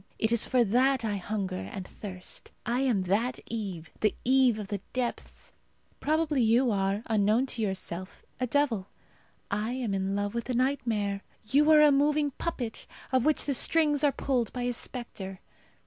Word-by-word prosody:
It 220 - +1
is 235 - +3
for 250 -2 +4
that 250 +3 +2
I 205 -2 -1
hunger 190 -1 -3
and 190 -2 -6
thirst. 185 -3 -6
I 240 +1 0
am 245 -8 +2
that 220 +7 0
Eve, 195 -8 -5
the 215 - +2
Eve 255 -3 +4
of 205 -2 -6
the 205 -2 -3
depths. 250 -2 -4 0.5
Probably 310 -2 +1
you 235 +2 +4
are, 195 +1 0
unknown 220 +3 +2
to 235 -3 -2
yourself, 190 -2 -4 0.2
a 255 - 0
devil. 235 -7 +1 0.6
I 210 +4 -1
am 245 -5 -2
in 195 0 -1
love 205 0 -1
with 235 +2 -4
a 250 - 0
nightmare. 230 -6 0 0.2
You 285 +7 +3
are 305 -1 +8
a 300 -1 +7
moving 290 +1 +2
puppet, 250 -6 -4 0.2
of 260 -2 +2
which 310 -1 +2
the 285 - 0
strings 300 +2 +3
are 290 - +5
pulled 250 -4 -1
by 250 - -3
a 245 0 0
spectre. 200 -7 -5
235 Hz, 175 wpm, -29 LUFS, 200-265 Hz, 0.6 s, are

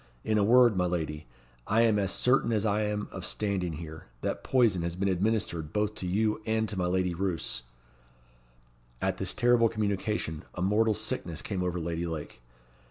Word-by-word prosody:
In 110 -1 +1
a - - +3
word, 120 +1 +6
my 90 -1 +2
lady, 80 -4 -3 0.4
I 110 +3 +3
am 110 -3 +4
as 100 -1 0
certain 125 0 +2
as 110 -1 +1
I 105 0 +2
am 105 0 -2
of 95 - -7
standing 95 -5 -1
here, 80 -1 -8
that - - -2
poison 115 -9 +3
has 85 0 -3
been 100 +2 0
administered 95 -5 0
both 105 +1 0
to 90 - -3
you 105 +3 +1
and 110 0 +1
to 105 - -3
my 90 -2 0
Lady 90 0 +1
Roos." 90 -7 -2 1.4
At - - -1
this - - -2
terrible 120 -1 +4
communication, 100 -6 -2
a 90 - -4
mortal 105 +3 +3
sickness 85 -4 -3
came 95 -3 -3
over 90 -1 -1
Lady 85 +1 -2
Lake. 75 -6 -6
100 Hz, 180 wpm, -29 LUFS, 85-110 Hz, 1.4 s, word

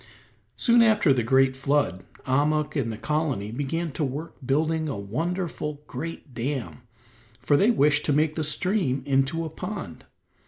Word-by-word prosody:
Soon 235 -1 +5
after 215 -10 +4
the 125 - +1
great 130 +3 +3
flood 135 - 0 0.2
Ahmuk 150 +4 +1
and 125 -6 0
the 110 - -6
colony 145 -7 -1
began 145 +6 -2
to 155 - -3
work 145 +5 -4
building 155 +4 0
a 135 - -3
wonderful, 150 - -3
great 165 -4 -7
dam, 120 - -4 0.6
for 130 +4 +2
they 200 +9 +4
wished 150 -9 +3
to - - +1
make 155 +1 +2
the 160 - -1
stream 155 -3 0
into 140 +4 +1
a - - -4
pond. 195 +6 -7
145 Hz, 155 wpm, -25 LUFS, 130-165 Hz, 0.6 s, Soon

